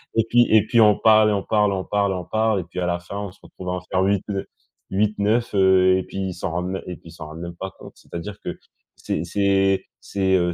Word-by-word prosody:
et 115 - +3
puis 120 0 +5
et 105 - +6
puis 115 +1 +2
on 105 -2 +6
parle 110 -1 +5
et - - +1
on 100 - 0
parle, 105 -2 +2
on 95 - -2
parle, 100 -1 0
on 90 -1 -4
parle 110 -1 +1
et - - -4
puis 90 - -7
à 90 - 0
la 85 0 -1
fin, 95 +3 -8
on 100 -2 -5
se 100 - -22
retrouve 90 -1 -9
à - - 0
en 90 - -3
faire 95 +1 -1
8 100 -1 +1
de 100 -1 -3 0.4
8-9, 105 +3 +1
heu 95 -1 +5
et 95 - -2
puis - - -10
ils 95 -1 -2
s'en 90 -1 -4
rendent 90 +3 -3
et 90 - -6
puis 85 - -15
ils - - -12
s'en 80 -1 -9
rendent 80 +1 -9
même 85 0 -7
pas 95 +2 -6
compte. - - -12
C'est-à-dire 100 +4 -8
que - - -6 0.4
c'est - - -3
c'est, 95 +1 +2 0.5
heu, 90 -1 +1
95 Hz, 260 wpm, -22 LUFS, 90-105 Hz, 0.5 s, et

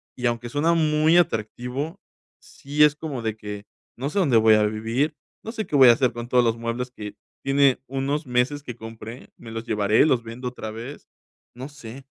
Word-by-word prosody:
Y 125 - -5
aunque 120 0 -1
suena 150 +5 +2
muy 155 0 +3
atractivo, 130 - -1 0.4
sí 145 +2 0
es 150 -1 +5
como 150 -5 -5
de 110 -1 -3
que 105 -1 -8 0.3
no 135 +4 -3
sé 180 - -6
dónde 140 - +4
voy 110 -1 +6
a 105 - +3
vivir, 115 +8 -1 0.3
no 225 - -5
sé 220 -4 -4
qué 150 - -2
voy 130 -3 +8
a - - +10
hacer 125 0 +1
con 120 0 -6
todos 125 0 +3
los 115 -1 +1
muebles 115 +2 -3
que 105 -4 -9 0.3
tiene 135 -1 +3
unos 135 +4 -2
meses 125 +4 0
que 125 -4 -7
compré, 115 +1 -10
¿me 115 - -11
los 115 0 -5
llevaré, 105 0 +3
los 125 -6 +2
vendo 115 +3 -7
otra 115 -3 -6
vez? 120 +6 -9 0.5
No 130 +3 -8
sé. 135 -2 -11
125 Hz, 200 wpm, -24 LUFS, 115-145 Hz, 0.5 s, a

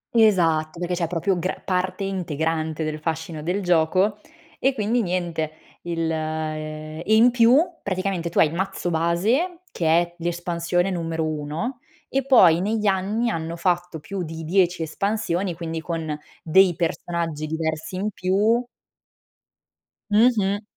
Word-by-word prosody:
Esatto, 170 -8 +3
perché 175 +1 -2
c'è 175 -1 0
proprio 180 +2 0
gra 185 - -2
parte 185 +1 -1
integrante 160 -4 -2
del 155 0 -3
fascino 160 0 -3
del 180 +6 -1
gioco 185 +4 +2 0.4
e 270 +1 +2
quindi 230 +2 +1
niente 175 -4 -2 0.3
il 165 -1 -1
e 155 0 -4
in 240 +3 +6
più, 235 +1 +5 0.3
praticamente 185 -3 -2
tu - - -7
hai - - +7
il 160 - -8
mazzo 190 -1 -2
base 215 - +1
che 165 - -2
è 170 +2 +3
l'espansione 175 +1 -1
numero 165 -2 -2
1 155 - -3 0.3
e 270 0 0
poi 180 -11 +6
negli 215 +2 -1
anni 205 +4 +1
hanno 165 +1 -3
fatto 175 -1 -1
più 190 +5 -5
di 160 0 -6
10 180 0 +2
espansioni 195 +1 -1
quindi 165 -1 -4
con 160 -2 -3 0.3
dei 180 +2 +5
personaggi 165 -2 -2
diversi 160 +2 -3
in 205 +3 -2
più 205 +6 +2 1.5
Mh-mh. 210 -2 +3
175 Hz, 135 wpm, -23 LUFS, 160-195 Hz, 1.5 s, hai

